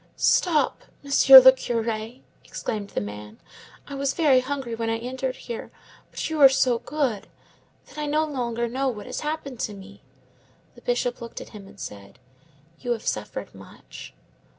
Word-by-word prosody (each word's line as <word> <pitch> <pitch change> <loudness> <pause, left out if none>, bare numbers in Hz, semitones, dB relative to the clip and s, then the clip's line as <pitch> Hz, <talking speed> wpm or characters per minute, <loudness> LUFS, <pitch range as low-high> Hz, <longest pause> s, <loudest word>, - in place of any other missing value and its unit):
"Stop, 325 -5 +2 0.2
Monsieur 275 -1 +9
le 260 0 +9
Curé," 230 -1 -4 0.2
exclaimed 205 -2 -5
the - - -3
man. 105 +1 -8 0.5
"I 285 - -8
was 275 0 -1
very 285 -6 +4
hungry 260 -2 -4
when 225 0 -2
I 225 - 0
entered 255 +2 -4
here; 235 -3 -7 0.4
but - - -4
you 315 -2 -2
are 270 - +10
so 255 -3 +2
good, 250 -5 -2 0.6
that - - -11
I 300 - -2
no 305 +2 +1
longer 240 -5 -2
know 265 +3 -2
what 215 -5 -4
has - - -5
happened 300 -5 -5
to 210 - -3
me." 200 +1 -13 0.7
The - - -17
Bishop - - -1
looked 235 - -7
at - - -10
him, 205 -3 -12
and 200 0 -16
said,— 100 -1 -9 0.6
"You 245 - -1
have 225 - -8
suffered - - -4
much?" - - -13
250 Hz, 170 wpm, -24 LUFS, 225-280 Hz, 0.7 s, are